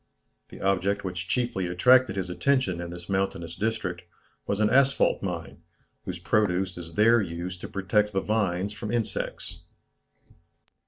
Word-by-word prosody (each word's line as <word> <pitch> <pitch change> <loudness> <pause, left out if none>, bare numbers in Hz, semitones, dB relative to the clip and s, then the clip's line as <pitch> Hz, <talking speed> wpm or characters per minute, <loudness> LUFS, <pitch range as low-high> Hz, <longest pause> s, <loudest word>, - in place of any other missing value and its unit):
The - - -11
object 100 +1 +1
which 90 -2 -4
chiefly 120 -7 0
attracted 125 +5 +4
his 95 -2 -3
attention 130 -5 +1
in 85 - -5
this 85 0 -9
mountainous 95 -4 -2
district, 105 -5 -2 0.5
was 100 - -1
an 110 - +4
asphalt 135 +1 +3
mine, 90 -4 -5 0.4
whose 90 - -4
produce 90 -1 +1
is 85 -2 -9
there 115 +3 +5
used 90 0 -5
to - - -5
protect 105 +2 +1
the 95 -1 0
vines 100 -2 0
from 105 +1 -5
insects. 120 -2 -3
95 Hz, 145 wpm, -27 LUFS, 90-110 Hz, 0.5 s, there